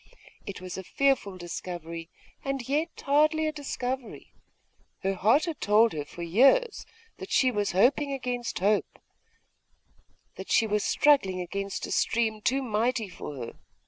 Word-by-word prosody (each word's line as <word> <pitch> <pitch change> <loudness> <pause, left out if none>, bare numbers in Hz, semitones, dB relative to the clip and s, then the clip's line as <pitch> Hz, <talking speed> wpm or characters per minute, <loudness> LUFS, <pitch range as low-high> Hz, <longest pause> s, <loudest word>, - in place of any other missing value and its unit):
It 200 - -6
was 185 0 -6
a - - -7
fearful 260 -5 +1
discovery, 170 -1 -6 0.3
and 275 -3 -3
yet 300 +5 0 0.2
hardly 310 +3 +3
a 310 - 0
discovery. 260 -4 -5 0.7
Her 195 +1 +1
heart 220 - +3
had 330 -3 -5
told 215 +2 +4
her 150 -2 -4
for 170 +4 -8
years 275 - +3 0.3
that - - -8
she 260 -1 +3
was 205 -4 -1
hoping 275 +9 +3
against 250 -3 -3
hope, 205 +3 +1 1.4
that - - -8
she 225 - +4
was 210 -1 0
struggling 230 -11 +3
against 195 +2 -4
a - - -7
stream 220 -2 +1
too 270 +5 +1
mighty 230 -1 0
for 150 -4 -8
her. 120 -3 -6
225 Hz, 145 wpm, -27 LUFS, 190-275 Hz, 1.4 s, told